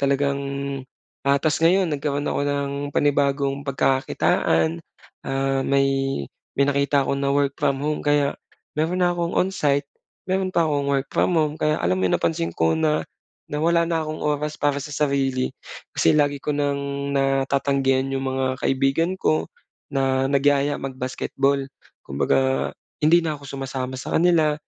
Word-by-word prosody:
talagang 140 Hz, 0 st, +1 dB, 0.9 s
ah, 140 Hz, -, +5 dB
tapos 155 Hz, -2 st, +1 dB
ngayon 175 Hz, +1 st, +3 dB
nagkaro'n 145 Hz, 0 st, -2 dB
ako -, -, -1 dB
ng 140 Hz, -1 st, -1 dB, 0.2 s
panibagong 140 Hz, -1 st, +2 dB
pagkakakitaan. 85 Hz, -11 st, +1 dB, 0.5 s
Ah, 135 Hz, 0 st, 0 dB
may, 135 Hz, -, +1 dB, 0.4 s
may 140 Hz, -, +5 dB
nakita 140 Hz, 0 st, +2 dB
ako 140 Hz, -, -1 dB
na 140 Hz, 0 st, 0 dB
work 140 Hz, -1 st, +1 dB
from 140 Hz, -2 st, +1 dB
home 150 Hz, 0 st, -1 dB
kaya 145 Hz, -1 st, +2 dB, 0.4 s
meron 170 Hz, +4 st, 0 dB
na 175 Hz, -, +4 dB
akong 170 Hz, 0 st, -2 dB
onsite, 145 Hz, -7 st, +1 dB, 0.4 s
meron 185 Hz, 0 st, 0 dB
pa 165 Hz, -2 st, +3 dB
akong 145 Hz, -1 st, 0 dB
work 135 Hz, 0 st, 0 dB
from -, -, +1 dB
home. 155 Hz, -2 st, +2 dB
Kaya 155 Hz, 0 st, +1 dB
alam 90 Hz, +2 st, +1 dB
mo 95 Hz, -, +2 dB
'yun -, -, +1 dB
napansin 165 Hz, 0 st, -1 dB
ko 80 Hz, 0 st, +2 dB
na, 155 Hz, -1 st, +1 dB, 0.5 s
na 150 Hz, -, -2 dB
wala 170 Hz, +2 st, +3 dB
na 165 Hz, -1 st, 0 dB
akong 155 Hz, 0 st, -5 dB
oras 150 Hz, 0 st, -1 dB
para 145 Hz, -1 st, +1 dB
sa 145 Hz, +1 st, -7 dB
sarili 135 Hz, -3 st, 0 dB, 0.4 s
kasi -, -, +3 dB
lagi 145 Hz, -1 st, +2 dB
ko 150 Hz, +1 st, -2 dB
ng 140 Hz, -1 st, -2 dB
natatanggihan 135 Hz, 0 st, +1 dB
'yong 135 Hz, -, -1 dB
mga 130 Hz, 0 st, -1 dB, 0.2 s
kaibigan 135 Hz, +6 st, +1 dB
ko 155 Hz, -, 0 dB, 0.4 s
na 135 Hz, -1 st, +1 dB
nagyaya 145 Hz, +1 st, +2 dB
mag-basketball. 135 Hz, +1 st, -1 dB, 0.5 s
Kumbaga 130 Hz, -, +1 dB, 0.3 s
hindi 165 Hz, +3 st, +6 dB
na 155 Hz, -2 st, -1 dB
ko -, -, -13 dB
sumasama 135 Hz, -1 st, -4 dB
sa -, -, -6 dB
kanila, 160 Hz, -3 st, +3 dB
140 Hz, 155 wpm, -23 LUFS, 135-150 Hz, 0.9 s, hindi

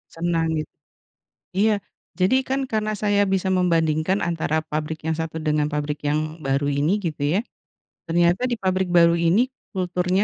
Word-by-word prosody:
Senang 165 Hz, -1 st, 0 dB
ya. 155 Hz, -, -3 dB, 0.9 s
Iya 215 Hz, +2 st, +4 dB, 0.4 s
jadi 185 Hz, +7 st, +3 dB
kan 270 Hz, +1 st, +1 dB
karena 215 Hz, -1 st, 0 dB
saya 205 Hz, 0 st, +2 dB
bisa 190 Hz, 0 st, +1 dB
membandingkan 165 Hz, 0 st, +1 dB
antara 165 Hz, -2 st, 0 dB
pabrik 155 Hz, 0 st, -4 dB
yang 160 Hz, -, +1 dB
satu 160 Hz, 0 st, -4 dB
dengan 150 Hz, -1 st, 0 dB
pabrik 150 Hz, 0 st, -2 dB
yang 155 Hz, +2 st, -2 dB
baru 135 Hz, 0 st, 0 dB
ini 145 Hz, +3 st, +1 dB
gitu 155 Hz, -3 st, -3 dB, 0.2 s
ya, -, -, +3 dB, 0.6 s
ternyata 170 Hz, +3 st, +2 dB
di -, -, +2 dB
pabrik 185 Hz, -1 st, 0 dB
baru 170 Hz, -1 st, +5 dB
ini 170 Hz, +9 st, +3 dB, 0.2 s
kulturnya 180 Hz, 0 st, 0 dB
170 Hz, 150 wpm, -23 LUFS, 155-185 Hz, 0.9 s, baru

